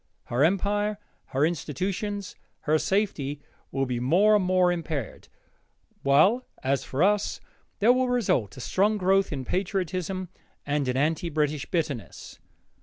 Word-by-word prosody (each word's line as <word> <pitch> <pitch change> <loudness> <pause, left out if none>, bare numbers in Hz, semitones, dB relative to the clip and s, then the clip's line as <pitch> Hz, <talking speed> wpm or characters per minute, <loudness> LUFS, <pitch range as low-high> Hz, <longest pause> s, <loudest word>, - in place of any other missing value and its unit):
Her 125 +4 0
empire, 205 +4 +1 0.3
her 135 +3 +1
institutions, 185 - -3 0.3
her 155 +1 +2
safety, 150 -9 -1 0.3
will 135 0 0
be 125 -2 -2
more 185 - +4
and 205 - +3
more 180 -1 +3
impaired, 160 - -4 0.7
while, 170 - +4 0.2
as 135 +1 +1
for 135 +6 -1
us, 205 +1 +1 0.4
there 230 +4 +5
will 255 0 +1
result 185 - 0
a - - -7
strong 205 - +1
growth 195 0 +2
in 135 -3 -4
patriotism 185 - -2 0.4
and 145 -1 0
in 125 0 0
anti 160 +5 0
British 150 -2 -1
bitterness. 150 - -4
175 Hz, 135 wpm, -26 LUFS, 140-200 Hz, 0.7 s, there